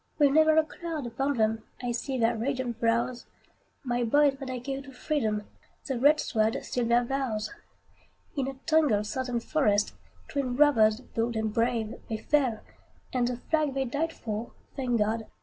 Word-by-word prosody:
With 290 -2 +5
never 315 +1 +5
a 315 - +6
cloud 320 -3 -5
upon 270 +4 -1
them, 220 0 +2 0.2
I 245 -1 -2
see 260 +3 -2
their 230 -1 +2
radiant 250 0 -2
brows; 235 +1 0 0.6
My 245 -2 0
boys 285 +4 +4
that 270 -2 -6
I 255 - -3
gave 270 +2 -5
to 275 - -11
freedom, 235 -6 -1 0.4
The 265 -3 -2
red 295 +4 +5
sword 220 -1 +1
sealed 240 -2 -1
their 240 +1 +4
vows! 240 -4 -2 0.8
In 270 -3 -1
a 270 - -4
tangled 300 -11 +3
Southern 245 +2 -2
forest, 215 -6 +1 0.3
Twin 265 -4 -2
brothers 235 -6 +4
bold 230 -1 -2
and 220 -1 -1
brave, 230 -1 0
They 220 - -1
fell; 250 -1 +1 0.5
and 245 -2 +2
the 245 -1 -2
flag 305 -4 +2
they 270 -1 0
died 295 +6 -1
for, 220 -4 -5 0.2
Thank 250 -3 0
God! 220 +1 0
245 Hz, 170 wpm, -28 LUFS, 225-275 Hz, 0.8 s, a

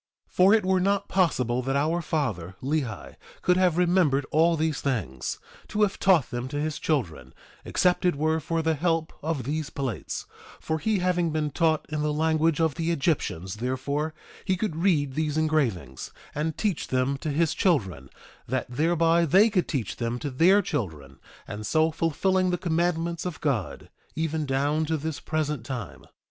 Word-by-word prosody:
1:4 - - -32
For 190 +3 +6
it 215 - +1
were 190 0 +3
not 200 +1 +1
possible 130 -10 +1
that 135 +2 -2
our 160 +5 +1
father, 110 - -2
Lehi, 135 -6 -3 0.3
could 180 - +4
have 180 -3 +2
remembered 175 -6 +3
all 165 +2 +3
these 155 -1 -1
things, 95 - -2 0.3
to 210 0 +1
have 200 -1 0
taught 180 -9 +3
them 120 +1 -3
to 145 +2 -4
his 155 0 -2
children, 80 - -2 0.3
except 180 +1 +1
it 180 -3 +2
were 155 +2 +1
for 165 +2 -2
the 160 0 +2
help 165 +1 0
of 155 -3 -2
these 150 +3 -3
plates; 130 -7 -4 0.3
for 160 0 -2
he 215 +4 +1
having 180 -2 +1
been 155 -1 -1
taught 160 +1 +1
in 155 -1 -2
the 150 0 0
language 160 +1 +1
of 160 -3 +2
the 165 +2 -2
Egyptians 135 - -1
therefore 140 +6 -2 0.3
he 185 - 0
could 195 -4 -2
read 160 -6 +1
these 155 +1 -1
engravings, 130 - -1 0.2
and 155 +1 -2
teach 205 -7 -1
them 130 +2 0
to 155 - -3
his 155 +2 +1
children, 95 - 0 0.4
that 130 +2 -1
thereby 165 +4 +3
they 195 +8 +5
could 185 -4 +1
teach 125 - -3
them 120 0 -2
to 140 +3 -4
their 185 +10 +5
children, 75 - -4 0.3
and 105 0 -6
so 160 +6 +3
fulfilling 185 +4 +1
the 180 - 0
commandments 170 -1 -1
of 175 -5 -5
God, 130 - -2 0.2
even 160 -1 -1
down 145 +4 +1
to 160 +1 0
this 155 0 -4
present 150 -5 -2
time. 120 -5 -6
155 Hz, 175 wpm, -26 LUFS, 135-170 Hz, 0.4 s, For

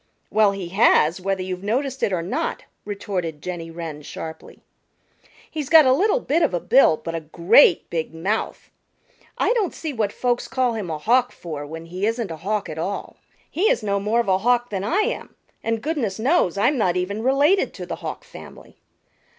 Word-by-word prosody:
"Well 215 -2 +4
he 195 -3 -6
has, 180 -3 +3
whether 190 0 -1
you've 185 -1 -5
noticed 260 +5 -1
it - - +1
or 175 -3 -1
not," 265 - -3 0.2
retorted 185 -6 -4
Jenny 170 0 -6
Wren 165 -3 -7
sharply. 160 +2 -9 0.9
"He's 300 -4 -4
got 320 -3 +8
a 260 - +5
little 410 - +2
bit 330 - 0
of 305 - +2
a - - 0
bill, 245 -6 +4
but 165 - -6
a 165 - -2
great 170 - +4
big 160 -2 -2
mouth. 190 +7 -3 0.7
I - - +2
don't 430 -7 -1
see 315 -3 -5
what 215 -4 -1
folks 245 +1 -1
call 255 -2 0
him 210 -6 -4
a 155 - -2
Hawk 245 +9 +2
for 150 -4 -7
when 160 +2 -8
he 185 +5 -2
isn't 230 -4 -2
a 160 - -6
Hawk 200 +5 -2
at 155 - -6
all. 195 +5 -4 0.3
He 385 +7 +1
is 230 - +1
no 200 -1 0
more 210 +4 +1
of 235 - -7
a 190 -1 +3
Hawk 245 +2 +1
than 195 -2 -2
I 360 - +1
am, 425 - -3 0.3
and 225 -1 -2
goodness 270 -11 -2
knows 235 - +2
I'm 250 +7 +2
not 180 -4 +2
even 200 +4 -2
related 285 - +3
to - - -6
the - - -5
Hawk - - -6
family." - - -13
205 Hz, 200 wpm, -22 LUFS, 175-255 Hz, 0.9 s, got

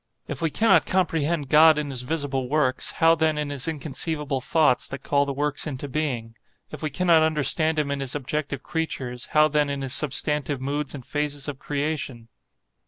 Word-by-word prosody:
If - - -5
we 165 - +1
cannot 190 0 +3
comprehend 165 -5 0
God 155 +1 +7
in 150 -2 -2
his 130 -2 -3
visible 135 -2 -2
works, 140 -3 +1
how 165 0 +5
then 160 -1 +1
in 150 -1 -2
his 140 +1 -3
inconceivable 150 -2 -3
thoughts, 150 -2 +2
that 135 - -8
call 140 0 +1
the - - -1
works 145 +2 -1
into 145 -1 -5
being? 130 -6 -3 0.4
If 150 - -8
we 155 - -1
cannot 170 +2 +3
understand 155 +1 +2
him 145 -2 0
in 140 - -2
his 135 -1 -3
objective 145 0 -3
creatures, 130 -7 -4
how 155 0 +6
then 150 -1 +1
in 140 -1 -3
his 135 -1 -2
substantive 150 -1 -1
moods 140 +2 -3
and 130 -4 -9
phases 145 -1 -2
of 140 -2 -5
creation? 140 -5 -3
145 Hz, 185 wpm, -24 LUFS, 135-155 Hz, 0.4 s, God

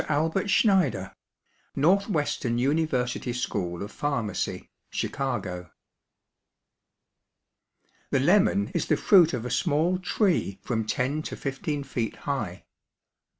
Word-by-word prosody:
ALBERT 160 +7 0
SCHNEIDER, 175 - +2 0.6
Northwestern 150 - +1
University 130 -2 0
School 95 -7 -3
of 105 - -7
Pharmacy, 125 -8 -2 0.2
Chicago. 100 -10 -3 2.4
The - - +2
lemon 200 +6 +3
is - - -1
the - - +2
fruit 180 -6 +6
of 125 -2 -3
a 125 - -4
small 170 +4 +1
tree 180 - 0
from 110 -2 -1
ten 135 +7 0
to - - -6
fifteen 140 +1 -3
feet 120 -4 -3
high. 110 -10 -4
140 Hz, 105 wpm, -26 LUFS, 115-165 Hz, 2.4 s, fruit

